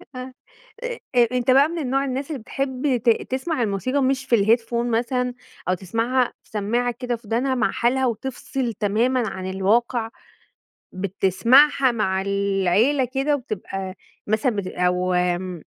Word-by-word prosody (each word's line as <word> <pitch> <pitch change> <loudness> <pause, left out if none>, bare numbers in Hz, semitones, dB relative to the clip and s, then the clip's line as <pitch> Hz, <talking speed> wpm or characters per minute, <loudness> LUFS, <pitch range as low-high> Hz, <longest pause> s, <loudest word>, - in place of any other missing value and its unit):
آه، 255 +1 -7 0.5
أ - - -3 0.2
أ 240 -1 +5
أنت 250 0 +1
بقى 275 +3 +6
من 320 -7 -3
نوع 270 +1 +1
الناس 270 +3 -3
اللي 280 - -4
بتحب 265 +2 -1
ت 235 - +4 0.2
تسمع 265 0 -1
الموسيقى 255 +7 0
مش 270 +1 0
في 240 - +3
الheadphone 235 +1 +2
مثلًا، 250 +1 -1 0.4
أو - - +3
تسمعها 230 +7 0
في - - -27
سمّاعة 235 +4 0
كده 245 -2 -1
في 225 -2 -15
ودانها 255 +4 0
مع 245 - +1
حالها 260 +3 +1
وتفصِل 250 +1 -3
تمامًا 225 +4 +1
عن 185 0 -5
الواقع، 225 +4 +1 0.8
بتسمعها 230 +9 +3
مع 190 -4 0
العيلة 200 +6 +2
كده 270 +4 0
وبتبقى 195 -6 -5 0.3
مثلًا 220 +2 +1
بت 195 -2 -3
أو 180 0 0
240 Hz, 145 wpm, -23 LUFS, 200-260 Hz, 0.8 s, بقى